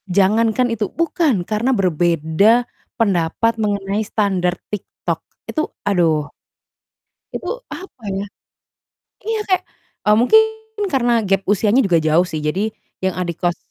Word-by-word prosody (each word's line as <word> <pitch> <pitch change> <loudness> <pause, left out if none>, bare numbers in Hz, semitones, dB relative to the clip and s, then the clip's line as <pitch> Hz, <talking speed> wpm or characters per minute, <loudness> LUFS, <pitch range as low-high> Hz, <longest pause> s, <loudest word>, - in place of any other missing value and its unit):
Jangankan 220 +6 +2
itu, 210 -3 -2
bukan, 320 - 0
karena 215 +5 -1
berbeda 175 +5 +3 0.3
pendapat 200 +1 +1
mengenai 200 0 -1
standar 190 -5 0 0.2
TikTok, 205 - -4 0.3
itu, 310 -1 -2 0.2
aduh. 160 -6 +1 1.0
Itu, - - -5 0.2
apa 350 -9 -10
ya 195 +1 -2 1.0
iya 445 +1 -1
kayak, 370 -1 +2 0.4
eee, 210 - +5
mungkin 440 - +6 0.5
karena 245 -3 +2
gap 195 0 +2
usianya 210 +4 +3
juga 180 -7 +3
jauh 160 +2 +3
sih, 155 - -4
jadi 190 +8 0 0.3
yang 190 -1 0
adik 175 -2 -3
kos 175 -1 +1
200 Hz, 125 wpm, -19 LUFS, 175-230 Hz, 1.0 s, mungkin